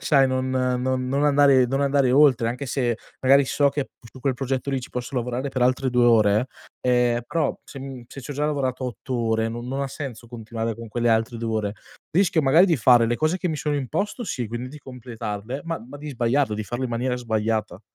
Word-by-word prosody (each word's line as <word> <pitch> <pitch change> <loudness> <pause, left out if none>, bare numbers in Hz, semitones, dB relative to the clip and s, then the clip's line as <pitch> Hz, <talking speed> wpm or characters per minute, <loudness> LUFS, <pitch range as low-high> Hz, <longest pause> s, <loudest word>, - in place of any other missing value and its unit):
sai 135 -3 +4
non 130 0 -1
non 130 0 0
non 140 +3 +1
andare 140 -3 +5
non 135 +3 -1
andare 140 -2 +2
oltre, 130 -5 +5
anche 125 +4 -3
se 125 -3 0 0.3
magari 140 +2 +6
so 140 +2 +2
che 140 -1 -2
p - - -35 0.2
su 130 - -14
quel 130 -1 0
progetto 135 +1 -2
lì, 135 - 0
ci 120 - -9
posso 125 +2 -5
lavorare 125 +3 -2
per 130 -2 -2
altre 130 +1 +2
2 125 0 +3
ore, 110 0 +4 0.3
ehm, 125 -1 +2
però 165 +5 0
se, 135 - -10
mhmm, 135 -2 -7
se 135 - -10
c'ho 135 +3 -7
già 145 +1 -2
lavorato 130 -3 -1
8 125 +1 -6
ore, 115 -1 0
non 120 +1 -6
non 135 +2 -3
ha 140 - -2
senso 125 -5 -7
continuare 115 -1 -4
con 115 0 -8
quelle 120 +2 -1
altre 115 +1 +1
2 115 0 -3
ore, 105 -2 -1 0.4
rischio 175 -2 +3
magari 155 +5 +5
di 175 -4 +2
fare 120 -1 +5
le 120 +1 0
cose 155 +6 0
che 180 - -1
mi 155 - -2
sono 150 0 -1
imposto 200 - -2
sì, 135 - -3
quindi 120 +3 -5
di 150 +3 -10
completarle, 125 -2 -6
ma 165 0 -2
ma 135 +4 -10
di 150 +1 -8
sbagliarle, 125 -2 +1
di 110 - -3
farle 120 +5 -4
in 125 - -3
maniera 125 +2 -1
sbagliata. 110 -4 -2
125 Hz, 225 wpm, -24 LUFS, 120-140 Hz, 0.4 s, magari